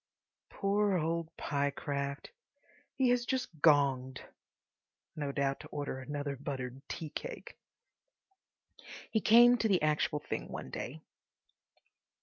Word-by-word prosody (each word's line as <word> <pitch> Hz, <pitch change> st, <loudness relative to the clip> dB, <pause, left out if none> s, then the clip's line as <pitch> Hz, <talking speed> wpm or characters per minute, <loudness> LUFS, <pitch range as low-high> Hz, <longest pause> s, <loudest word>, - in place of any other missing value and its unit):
Poor 200 Hz, -1 st, +1 dB
old 165 Hz, 0 st, -1 dB
Pyecraft! 140 Hz, 0 st, -2 dB, 0.6 s
He 260 Hz, -2 st, +3 dB
has 245 Hz, 0 st, +3 dB
just 255 Hz, -6 st, -2 dB
gonged, 135 Hz, -4 st, +4 dB, 1.0 s
no 145 Hz, -2 st, -2 dB
doubt 140 Hz, 0 st, 0 dB
to 155 Hz, -, -10 dB
order 145 Hz, -3 st, -4 dB
another 145 Hz, +1 st, -4 dB
buttered 130 Hz, -1 st, -5 dB
tea 155 Hz, -2 st, -5 dB
cake! -, -, -7 dB, 1.6 s
He 220 Hz, -, +2 dB
came 240 Hz, +2 st, +7 dB
to 225 Hz, -, +2 dB
the 185 Hz, -6 st, +2 dB
actual 150 Hz, -1 st, +1 dB
thing 150 Hz, -, -4 dB
one -, -, -6 dB
day. 150 Hz, +6 st, -5 dB
150 Hz, 115 wpm, -32 LUFS, 140-200 Hz, 1.6 s, came